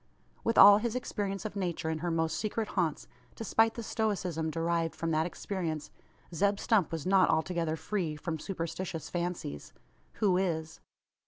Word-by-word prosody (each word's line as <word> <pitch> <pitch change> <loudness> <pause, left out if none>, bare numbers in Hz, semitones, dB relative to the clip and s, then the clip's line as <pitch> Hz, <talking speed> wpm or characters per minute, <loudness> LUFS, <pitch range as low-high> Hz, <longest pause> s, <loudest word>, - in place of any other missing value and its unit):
With 230 - 0
all 205 +1 +10
his 235 +1 -2
experience 200 -6 -3
of 215 - -4
Nature 175 -4 -2
in 160 - -2
her 175 +2 -2
most 160 -1 0
secret 215 +1 -2
haunts 170 -6 -1 0.3
despite 225 0 +2
the 235 - -5
stoicism 185 -8 -1
derived 165 0 -1
from 165 0 -2
that 160 +1 +2
experience 170 -5 -4 0.4
Zeb 200 +4 +2
Stump 205 -8 +2
was 165 -3 -4
not 190 0 +4
altogether 160 0 0
free 170 -2 -2
from 160 +1 -4
superstitious 165 -1 -4
fancies. 170 - -4 0.4
Who 190 -4 +2
is? 160 -4 -2
175 Hz, 155 wpm, -31 LUFS, 160-200 Hz, 0.4 s, all